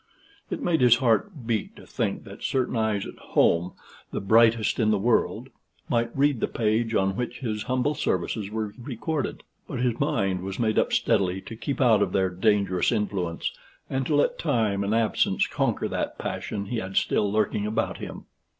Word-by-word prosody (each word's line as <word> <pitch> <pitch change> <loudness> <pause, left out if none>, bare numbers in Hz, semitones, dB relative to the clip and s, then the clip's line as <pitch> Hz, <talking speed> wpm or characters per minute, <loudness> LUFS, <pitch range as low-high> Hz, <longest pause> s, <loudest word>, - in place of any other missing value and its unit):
It 315 -6 -4
made 165 - +2
his 120 -2 +7
heart 130 - 0
beat 115 -3 -2
to - - -13
think - - -2
that - - -11
certain 130 -2 0
eyes 110 -3 0
at - - -10
home, 85 +2 +2 0.4
the - - -2
brightest 110 +3 +4
in 110 -2 +3
the 105 - +3
world, 115 +4 +1 0.4
might 115 0 +1
read 140 -3 +3
the - - 0
page 115 0 0
on 95 0 +2
which 125 0 -4
his 110 -4 -2
humble 130 +3 +1
services 100 - -1
were 110 -1 -3
recorded; 135 +4 -3 0.2
but - - -5
his 120 -2 0
mind 95 -4 0
was 95 +1 -5
made 110 -2 +2
up - - +1
steadily 95 -1 +2
to 115 - -9
keep 135 +5 -4
out 115 -5 +5
of 95 -3 0
their 95 -1 +2
dangerous 95 -1 +2
influence, 95 -5 -1 0.4
and 135 -1 -1
to 150 - +1
let 145 - +2
time 110 -10 +1
and 100 +3 0
absence 115 -1 +2
conquer - - -1
that - - -3
passion 100 -1 -4
he 115 +4 -3
had 95 -3 -4
still 100 -1 +2
lurking 105 -1 0
about 110 - -1
him. - - -8
110 Hz, 185 wpm, -26 LUFS, 100-120 Hz, 0.4 s, his